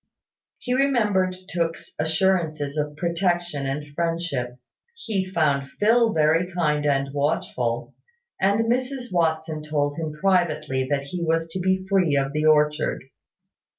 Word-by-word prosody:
He 250 - -3
remembered 210 -9 +2 0.2
Tooke's 170 -1 -2
assurances 160 -3 0
of 150 -1 -3
protection 175 -4 -1
and 145 +2 -4
friendship; 165 -7 -2 0.4
he 195 - -3
found 145 -6 +1
Phil 230 +2 +4
very 165 +2 +2
kind 150 -4 0
and 140 -1 0
watchful; 125 -4 -1 0.5
and 200 +3 +3
Mrs 250 0 -2
Watson 160 -2 0
told 145 -1 -1
him 160 -2 -3
privately 155 -6 +1
that 140 -1 0
he 170 +6 -5
was 165 0 +1
to 185 - -5
be 190 +1 0
free 185 -7 +2
of 135 0 0
the 150 +1 0
orchard. 150 0 +2
160 Hz, 130 wpm, -24 LUFS, 150-185 Hz, 0.5 s, Phil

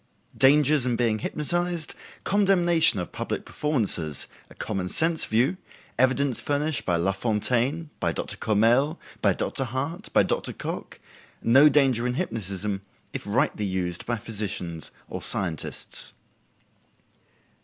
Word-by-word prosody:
Dangers 145 +1 +5
in 125 -1 0
Being 115 -2 +1
Hypnotized.—Condemnation 175 - +1
of 90 - -5
Public - - -4
Performances.—A. 100 - -2
Common 95 -4 -3
Sense 165 - +2
View.—Evidence 130 - 0
Furnished 145 0 -1
by 90 - +3
Lafontaine.—By 115 - 0
Dr. - - -3
Courmelles.—By. 120 +9 +2
Dr. - - -2
Hart.—By 130 +7 0
Dr. - - -1
Cocke.—No 135 +6 +1
Danger 135 -5 +3
in 125 - -1
Hypnotism 100 - -3 0.3
if - - -5
Rightly 110 -1 +1
Used 90 -2 -3
by 120 - +1
Physicians 100 -7 -5 0.2
or - - -6
Scientists. 85 -6 -4
125 Hz, 100 wpm, -26 LUFS, 105-150 Hz, 0.3 s, Dangers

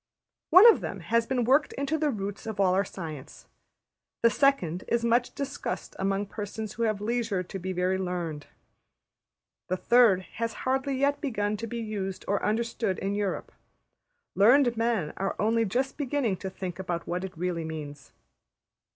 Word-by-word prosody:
One 370 +7 +9
of 460 - +6
them - - -5
has 230 0 +1
been 255 -2 0
worked 275 +5 +3
into 280 +3 -1
the 310 -1 +1
roots 205 -3 -4
of 215 -2 -5
all 185 -2 +4
our 195 +2 +3
science; 155 -7 -8 0.8
the 230 - +6
second 185 - +2
is 235 0 +1
much 240 +1 +2
discussed 280 0 -4
among 195 +1 0
persons 210 +1 -6
who 230 - -2
have 210 -2 -3
leisure 225 -4 -1
to 190 +2 -7
be 185 +1 -4
very 185 +1 0
learned. 175 -5 -4 1.2
The 185 - -1
third 235 -4 +5 0.2
has 230 0 0
hardly 265 +1 0
yet 285 +1 +1
begun 215 -8 -1
to 230 +2 -5
be 235 - -5
used 205 -4 -4
or 200 0 0
understood 225 -2 -1
in 195 +1 -2
Europe; 205 -1 -2 0.8
learned 240 +5 +5
men 225 -9 0
are 195 0 -2
only 225 +2 +2
just 260 +6 -1
beginning 270 -8 0
to 190 - -5
think 185 -1 -6
about 175 -2 -3
what 180 +2 -3
it 190 -3 -7
really 175 -1 -2
means. 145 -4 -7
210 Hz, 170 wpm, -28 LUFS, 185-240 Hz, 1.2 s, One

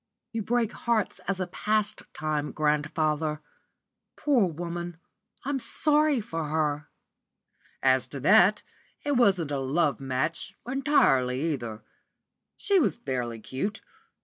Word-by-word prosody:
"You 230 - -2
break 230 +1 +1
hearts 230 -6 -1
as 195 -1 -1
a 185 - 0
pastime, 175 -7 -2
grandfather. 150 0 0 0.8
Poor 255 -10 +3
woman. 175 +1 -5 0.5
I'm 275 0 -1
sorry 300 +1 +2
for 165 -7 -4
her." 150 -1 -1 0.9
"As 130 -1 +4
to 140 - -6
that, 205 - +5 0.4
it 290 - -1
wasn't 195 - +3
a 140 - -1
love 140 +3 +1
match 135 +4 -2
entirely 165 - +2
either. 115 -5 -6 0.7
She 400 -2 +3
was 205 - +2
fairly 120 -4 -3
cute. 135 - -4
165 Hz, 115 wpm, -27 LUFS, 145-220 Hz, 0.9 s, that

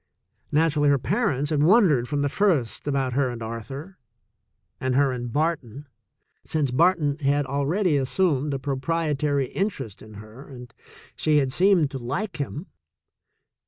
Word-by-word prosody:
Naturally, 150 -1 +2
her 140 - +4
parents 150 - -1
had 150 -2 +1
wondered 160 - +4
from 145 -1 0
the - - +2
first 150 - 0
about 135 -3 0
her 135 0 +1
and 120 -2 -6
Arthur, 135 - -7 0.8
and 130 -1 -1
her 140 0 +3
and 120 -1 -5
Barton, 145 -3 -2 0.6
since 150 -5 -1
Bar 170 +8 +4
ton 145 -3 -2
had 145 0 +1
already 145 +5 0
assumed 145 +1 0
a - - -1
proprietary 145 0 -1
interest 140 - -3
in 110 -1 -13
her 110 +7 -12
and 125 -3 -11 0.4
she 155 -1 +2
had 135 -3 +1
seemed 180 -5 +3
to 135 - -5
like 180 - -4
him. 145 +3 -5
145 Hz, 150 wpm, -24 LUFS, 130-160 Hz, 0.8 s, her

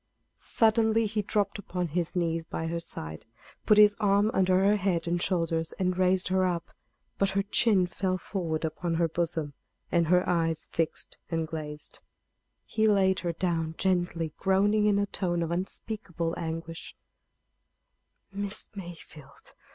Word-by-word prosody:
Suddenly 225 0 +3
he 210 0 -1
dropped 205 0 -1
upon 180 -3 -3
his 170 +2 -2
knees 165 -2 0
by 160 0 -4
her 170 +1 -2
side, 80 - -7 0.4
put 210 - +6
his 210 -1 +7
arm 205 +1 +3
under 185 -1 +3
her 205 +1 +5
head 180 -4 0
and 175 +1 0
shoulders 165 -3 0
and 185 -1 0
raised 185 0 +2
her 185 0 +2
up; 175 -2 -1 0.5
but 195 - +3
her 195 0 0
chin 205 -2 +3
fell 185 +1 -1
forward 170 -5 -3
upon 165 +2 -2
her 165 0 +2
bosom, 160 -3 -2 0.4
and 170 -2 +3
her 180 +2 +3
eyes 165 -2 0
fixed 165 -1 -2
and 165 -1 -1
glazed. 150 -2 -7 0.7
He 220 0 +1
laid 190 -3 +3
her 170 -1 -2
down 165 -2 -1
gently, 175 -4 0
groaning 205 +2 +3
in 205 -1 +3
a 200 - +2
tone 175 -4 -1
of 165 - -3
unspeakable 175 -2 -3
anguish: 165 0 -5 1.4
"Miss 200 +1 -5
Mayfield! 170 -6 -11
180 Hz, 150 wpm, -28 LUFS, 165-195 Hz, 1.4 s, his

